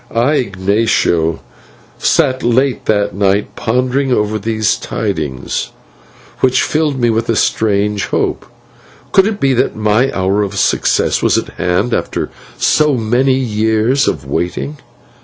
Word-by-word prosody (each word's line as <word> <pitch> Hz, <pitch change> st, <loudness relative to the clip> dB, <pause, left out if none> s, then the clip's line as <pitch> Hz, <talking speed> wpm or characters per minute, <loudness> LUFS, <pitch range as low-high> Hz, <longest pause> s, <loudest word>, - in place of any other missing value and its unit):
I, 125 Hz, +6 st, +1 dB
Ignatio, 95 Hz, -6 st, 0 dB, 0.6 s
sat 130 Hz, 0 st, +2 dB
late 125 Hz, +2 st, +1 dB
that 105 Hz, -1 st, +1 dB
night 100 Hz, +1 st, 0 dB
pondering 130 Hz, +3 st, 0 dB
over 110 Hz, -2 st, 0 dB
these 110 Hz, 0 st, 0 dB
tidings, 80 Hz, -, -3 dB, 0.7 s
which 130 Hz, -1 st, +2 dB
filled 150 Hz, -3 st, 0 dB
me 120 Hz, -1 st, +2 dB
with 115 Hz, +1 st, -1 dB
a 115 Hz, -, +2 dB
strange 105 Hz, -1 st, +1 dB
hope. -, -, -2 dB, 0.6 s
Could 195 Hz, +1 st, +4 dB
it 215 Hz, -2 st, -3 dB
be 135 Hz, -1 st, +2 dB
that 125 Hz, -, 0 dB
my 110 Hz, +5 st, +1 dB
hour 95 Hz, +2 st, 0 dB
of 100 Hz, -1 st, -3 dB
success -, -, +1 dB
was -, -, +2 dB
at -, -, -2 dB
hand 90 Hz, +7 st, -1 dB
after -, -, -2 dB, 0.3 s
so 150 Hz, -2 st, +2 dB
many 120 Hz, +4 st, +2 dB
years 110 Hz, +1 st, +1 dB
of -, -, -2 dB
waiting? 90 Hz, -, -3 dB
110 Hz, 135 wpm, -15 LUFS, 100-130 Hz, 0.7 s, Could